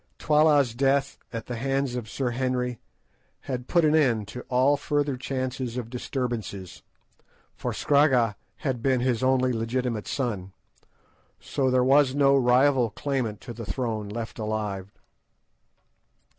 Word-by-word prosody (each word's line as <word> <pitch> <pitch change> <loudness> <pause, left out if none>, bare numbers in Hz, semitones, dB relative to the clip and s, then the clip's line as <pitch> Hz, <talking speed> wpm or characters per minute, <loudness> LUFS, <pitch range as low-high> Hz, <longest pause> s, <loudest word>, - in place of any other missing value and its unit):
Twala's 150 -5 +3
death 135 +2 +1
at 115 -2 -5
the 120 - -5
hands 135 +1 -1
of 120 -4 -5
Sir 130 0 -2
Henry 125 -1 -1 0.6
had 125 -2 -5
put 170 -2 +3
an 150 - +3
end 120 -9 +2
to 125 - -7
all 130 +3 +4
further 145 -1 -1
chance 130 0 -3 0.2
of 120 -2 -5
disturbance; 120 - -4 0.7
for - - -4
Scragga 130 -7 +3 0.2
had 130 -5 -3
been 130 -1 +2
his 125 -2 0
only 130 -1 +2
legitimate 115 -1 -2
son, 100 -8 -3 0.9
so 130 -1 -1
there 130 0 +3
was 135 0 +4
no 140 -1 +4
rival 130 -1 +4
claimant 120 -4 -3
to 120 - -8
the 115 - -7
throne 110 0 -3
left 115 +2 -6
alive. 105 -3 -3
125 Hz, 135 wpm, -26 LUFS, 115-135 Hz, 0.9 s, all